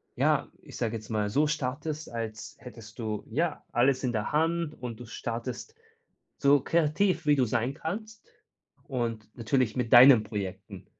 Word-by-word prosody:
ja, - - +1
ich - - -11
sage 115 -1 -1
jetzt 110 -1 -8
mal 105 -2 -1
so 150 +7 +2
startest, 150 +1 -3
als 115 -2 -6
hättest 115 -2 -12
du, 110 -3 -4
ja, 155 +6 -2
alles 130 +2 +2
in 125 - -1
der 110 +3 -2
Hand. 165 0 0
Und 120 -2 -6
du 120 - -8
startest 120 - -6 0.6
so 140 -1 +4
kreativ, 165 +3 +1
wie 145 -1 +5
du 130 - +3
sein 120 +3 -1
kannst 215 +7 -6 0.6
und 115 -5 -3
natürlich 125 0 0
mit 125 -2 -2
deinen 125 -2 +9
Projekten. 100 -2 -6
125 Hz, 160 wpm, -28 LUFS, 110-150 Hz, 0.6 s, deinen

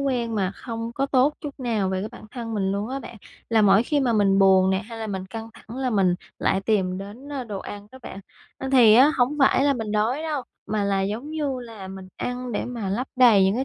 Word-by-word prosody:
quen 245 -5 -1
mà 190 -3 0
không 230 -1 -5
có 275 +2 0
tốt 275 +2 +3
chút 285 -2 -8
nào 220 -6 0
về 190 0 -1
cái 215 - -4
bản - - -12
thân 230 -2 -5
mình 195 -2 0
luôn 205 +3 -2
á 270 - -3
bạn, 235 - -10 0.3
là 220 -2 +4
mỗi 195 +1 +5
khi 290 +4 0
mà 250 -4 +1
mình 200 -2 +3
buồn 190 -1 +5
nè 190 - +2
hay 225 +4 -8
là 220 - -4
mình 190 -3 -4
căng 225 +3 -7
thẳng 230 +1 -11
là 260 -1 -1
mình 190 -5 +3 0.2
lại 195 - +1
tìm 190 -3 0
đến, 210 +8 -9
ơ, 270 -3 -3
đồ 210 -4 -5
ăn 205 +1 -8
đó 260 - -11
bạn. 195 - -8 0.4
Ơ, 265 - -4
thì 235 -5 +7
á 265 +6 +7
hổng 255 +4 +2
phải 270 -1 +4
là 285 -1 +3
mình 220 -4 -4
đói 225 +8 0
đâu, 305 -4 -2 0.2
mà 210 -1 -1
là, 200 -1 +1
giống 220 +9 -3
như 290 -5 -2
là, 225 -5 -9
mình 190 0 -9
ăn 250 0 -4
để - - -2
mà 235 -5 -4
lấp 230 +7 -2
đầy 230 -7 +6
những 195 - +2
cái 255 +3 -1
225 Hz, 260 wpm, -24 LUFS, 195-255 Hz, 0.4 s, thì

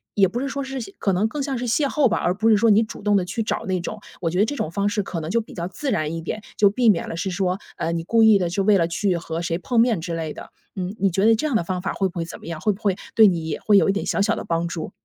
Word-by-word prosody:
也 195 -2 +5
不 230 +7 -4
是 275 - -2
说 280 +1 -3
是 270 0 -5 0.2
可 195 - 0
能 195 +5 +2
更 285 +5 -4
像 270 -1 -2
是 245 - -3
邂 240 +6 +1
逅 275 -2 +2
吧， - - 0
而 175 - +1
不 220 +4 +1
是 215 - +6
说 225 +1 +4
你 210 +2 +5
主 215 -2 -6
动 205 0 +3
地 190 -3 +2
去 200 +5 -3
找 - - -3
那 185 -1 0
种。 170 - -6 0.2
我 165 -2 -1
觉 180 - -1
得 205 - +5
这 290 - -4
种 160 - -3
方 200 +2 0
式 205 -1 -1
可 180 -3 -4
能 155 0 -5
就 230 - +2
比 225 - -8
较 170 -1 -4
自 260 +10 -4
然 155 0 -1
一 - - -3
点， 215 +6 -4 0.2
就 205 - +5
避 235 +2 +3
免 190 -6 +2
了 - - -5
是 175 +3 -2
说， 185 0 -1 0.2
呃， 165 - -2
你 165 -1 -2
故 225 +6 +3
意 220 -2 +6
地 175 -2 0
就 195 +3 -1
为 210 +1 +5
了 165 - +2
去 180 +2 0
和 165 -1 -5
谁 170 -1 -1
碰 225 +7 0
面 225 -6 +3
之 170 0 -4
类 160 -2 -4
的。 - - -10 0.3
嗯， 185 +3 -4
你 195 - +3
觉 190 +3 +1
得 225 - +6
这 270 +8 -1
样 280 - -1
的 220 - +2
方 180 +1 -3
法 195 - -2
会 195 - 0
不 180 - -9
会 - - 0
怎 165 - -9
么 - - -14
样？ 165 -1 -6
会 215 - +2
不 195 - -7
会 200 -3 +2 0.2
对 220 - +8
你 170 -4 -1
也 155 - -3
会 210 -2 +4
有 - - +2
一 - - +5
点 200 - -2
小 - - 0
小 200 - +2
的 - - -6
帮 165 0 0
助？ 170 0 -5
195 Hz, 370 characters per minute, -22 LUFS, 170-220 Hz, 0.3 s, 对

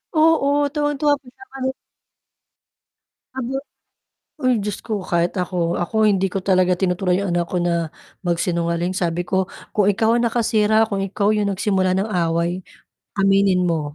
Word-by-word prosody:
Oo 290 -2 +3
tuwang-tuwa 295 -1 +1
pa - - -38
siya 395 - -15
kahit 265 0 -3 1.6
kahit 265 +1 -3 0.8
uy, 255 0 +3
Diyos 205 -1 -3
ko! 215 -3 -2
Kahit 170 0 +1
ako. 175 -1 -1
Ako 215 +5 +1
hindi 195 -2 +3
ko 195 0 -4
talaga 185 -1 +3
tinuturuan 180 0 +1
'yong 195 - -2
anak 175 0 0
ko - - -3
na 170 -2 0 0.4
magsinungaling. 170 0 0
Sabi 175 -2 -1
ko, 190 +1 0 0.3
"Kung 205 -2 +2
ikaw 220 +3 +2
ang 240 - +2
nakasira, 220 -2 +2
kung 200 -1 -1
ikaw 200 +1 0
yung 210 -1 +1
nagsimula 190 -1 +1
ng 200 +3 -1
away, 170 0 0 0.6
aminin 195 -1 +3
mo," 150 -3 -2
195 Hz, 150 wpm, -21 LUFS, 175-220 Hz, 1.6 s, Oo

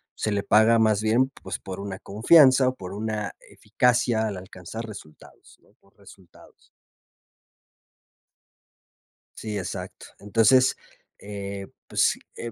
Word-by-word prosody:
se 110 - -2
le 100 -1 -1
paga 110 +3 +4
más 110 -2 +2
bien, 120 +5 +2
pues, - - -5
por 95 0 -8
una 100 -1 -6
confianza 130 +4 +5
o 130 - -6
por 95 -5 -9
una 105 0 -4 0.2
eficacia 120 -2 +1
al 100 -3 -5
alcanzar 95 +4 -9
resultados, 100 -9 -14
¿no? - - -29
Por - - -30
resultados. 95 -3 -19 2.7
Sí, 105 -2 -5
exacto. 90 0 -7
Entonces, 115 +5 +3 0.4
eh, 100 -1 -7 0.2
pues, - - +1 0.2
eh, 120 - -6
105 Hz, 120 wpm, -24 LUFS, 100-115 Hz, 2.7 s, confianza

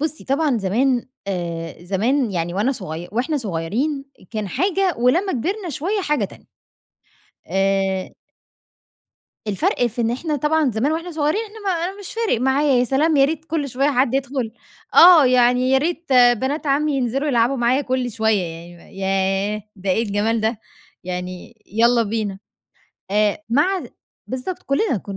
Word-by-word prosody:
بصّي 310 0 -3
طبعًا 275 -2 +1
زمان 240 +6 +1 0.2
آآ 170 -3 -4
زمان 230 +7 0
يعني 175 -1 -2
وأنا 215 +7 +1
صغي 175 - -6
وإحنا 255 +7 0
صغيرين 240 - -2 0.3
كان 215 -3 -3
حاجة 375 - +1
ولمّا 340 +11 +2
كِبرنا 360 - -2
شوية 365 - -2
حاجة 300 -5 0
تانية. - - -11 1.0
آآ 195 -1 0 1.4
الفرق 205 +4 +1
في 240 +1 -4
إن 230 0 +1
إحنا 300 +5 -2
طبعًا 300 0 +1
زمان 240 +8 0
وإحنا 335 +2 -3
صغيرين 310 +6 0
إحنا 435 0 -12
ما 385 - +2
أنا 385 +3 -5
مش 395 - -7
فارق 450 - 0
معايا، 270 +2 +2
يا 245 - +3
سلام، 295 +5 +2
يا 275 - +6
ريت 315 +2 -2
كل 315 -3 -2
شوية 270 +4 +1
حد 255 -1 +1
يدخل 265 -4 -2 0.4
آه، 335 -6 +9
يعني 250 +1 +3
يا 265 - +5
ريت 330 0 -2
بنات 255 +5 +3
عمي 285 +1 +1
ينزلوا 265 +3 -1
يلعبوا 245 0 +2
معايا 240 +3 +2
كل 255 -2 -1
شوية 220 -2 +1
يعني 170 +1 -8
م - - -18
ياه! 195 +2 -1
ده 190 0 -3
إيه 220 - +2
الجمال 220 +1 0
ده 220 0 -1 0.4
يعني 180 +4 -6
يالّا 235 +3 +3
بينا. 210 -3 -3 0.7
آآ، 210 0 +2
مع 325 +11 +2
ذ - - -7 0.4
بالضبط، 260 +8 -5
كُلّنا 275 - 0
كُ - - -7
250 Hz, 160 wpm, -21 LUFS, 205-295 Hz, 1.4 s, آه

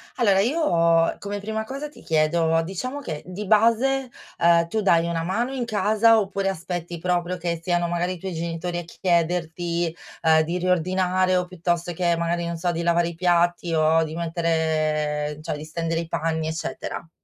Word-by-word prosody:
Allora 200 -6 +3
io 170 - +2
come 205 0 -4
prima 220 +2 -3
cosa 275 +6 -6
ti - - -16
chiedo: 160 +1 +2
diciamo 255 - -4
che 155 - -5
di 190 +3 -6
base, 235 +5 +3 0.3
uhm, 170 0 +4
tu 215 +5 -1
dai 170 -4 +3
una 165 -1 -1
mano 235 +9 -1
in 250 -3 -2
casa 220 +1 +4
oppure 195 -1 -1
aspetti 175 -1 -4
proprio 180 0 -1
che 170 -1 -2
siano 175 0 +1
magari 175 +1 -1
i 185 - -8
tuoi 190 0 -5
genitori 170 +1 -3
a - - -5
chiederti, 170 -1 -1 0.3
ehm, 160 -1 +5
di 170 +3 -2
riordinare 185 +1 +1
o 180 - 0
piuttosto 175 -1 -2
che 170 0 +1
magari, 170 0 -1
non 170 0 -3
so, 175 +1 0
di 170 0 -3
lavare 170 0 +2
i 170 - -9
piatti 175 -1 +1
o 160 +1 +3
di 160 0 -5
mettere 155 -3 0
cioè 155 - -3
di 150 - -8
stendere 165 +1 -2
i 165 - -7
panni 160 0 -1
eccetera? 160 0 -5
175 Hz, 180 wpm, -24 LUFS, 165-190 Hz, 0.3 s, ehm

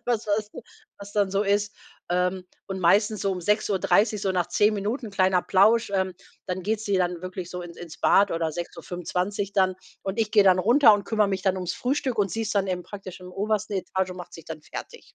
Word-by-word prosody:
was 230 -3 0
was 205 - +2
dann - - -10 0.4
was 200 0 -10
dann 205 -2 +1
so 195 +1 +1
ist. 205 +1 0 0.4
Ähm, 180 +1 0 0.2
und 190 -1 -5
meistens 205 +4 +3
so 195 - 0
um 185 -1 -3
6:30, 210 +2 +2
so 190 -2 0
nach 175 -2 0
10 210 +4 +3
Minuten, 215 +4 -3
kleiner 185 -2 +2
Plausch, 215 +3 +4
ähm, 190 -1 0 0.3
dann 185 0 -3
geht 215 +2 -1
sie 205 -3 0
dann 180 -1 -1
wirklich 185 -1 -6
so 180 0 -5
ins 170 -1 -10
ins 165 -2 -10
Bad 200 0 +4
oder 165 -1 -1
6:25 180 +4 -4
dann. 190 -2 +2 0.3
Und 195 +3 -4
ich 220 -2 +1
gehe 205 -1 +6
dann 185 -1 +5
runter 235 +4 +6
und 205 -1 -3
kümmere 215 -2 +1
mich 190 -1 -2
dann 190 -1 +1
ums 180 -2 -3
Frühstück 255 -2 -1
und 200 -2 +2
sie 225 +6 -2
ist 215 0 -3
dann 195 -1 +2
eben 180 -1 -2
praktisch 190 -2 -9
im 180 - -10
obersten 210 +1 -1
Etage 190 0 -2
und 180 - -8
macht 180 -1 -9
sich 165 - -11
dann 160 -2 -8
fertig. 470 - -9
195 Hz, 225 wpm, -25 LUFS, 180-210 Hz, 0.4 s, gehe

